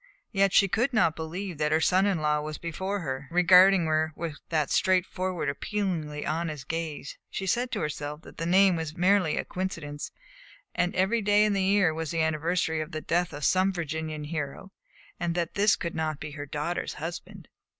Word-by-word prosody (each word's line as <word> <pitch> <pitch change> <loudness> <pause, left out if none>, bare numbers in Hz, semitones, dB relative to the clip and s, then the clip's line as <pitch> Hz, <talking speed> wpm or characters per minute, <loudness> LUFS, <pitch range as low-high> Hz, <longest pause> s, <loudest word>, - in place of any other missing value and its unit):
Yet 195 -1 +3
she 195 - +5
could 245 +7 0
not 170 -8 +3
believe 170 +1 -5
that 150 0 +1
her 155 - +4
son 185 +4 +3
in 185 -6 0
law 150 0 +1
was 155 0 -5
before 190 +4 -3
her, 135 -3 -4
regarding 180 +1 +6
her 155 0 +1
with 160 -3 -5
that 155 -4 0
straightforward, 185 -2 +1
appealingly 155 -1 -2
honest 155 -3 -3
gaze; 160 -3 -4
she 195 - -4
said 240 +7 0
to - - -1
herself 150 0 -4
that - - -14
the 165 - -3
name 190 +1 +5
was 160 -2 -4
merely 185 -2 +3
a - - -1
coincidence, 165 -6 -5 0.7
that 180 0 0
every 190 +5 +2
day 205 +1 +4
in 210 - +1
the 195 - +1
year 190 -3 +3
was 160 -1 -4
the 165 - -2
anniversary 160 +1 0
of 155 +2 -7
the 155 - -3
death 175 +2 0
of 145 0 -7
some 190 +1 +3
Virginian 160 -3 -4
hero, 150 +5 -5 0.5
and 170 -1 -1
that 170 -2 -1
this 205 +1 +4
could 170 - -4
not 155 -2 -2
be 150 - -6
her 145 0 -7
daughter's 150 +5 -3
husband. 175 +3 -7
170 Hz, 190 wpm, -27 LUFS, 155-190 Hz, 0.7 s, regarding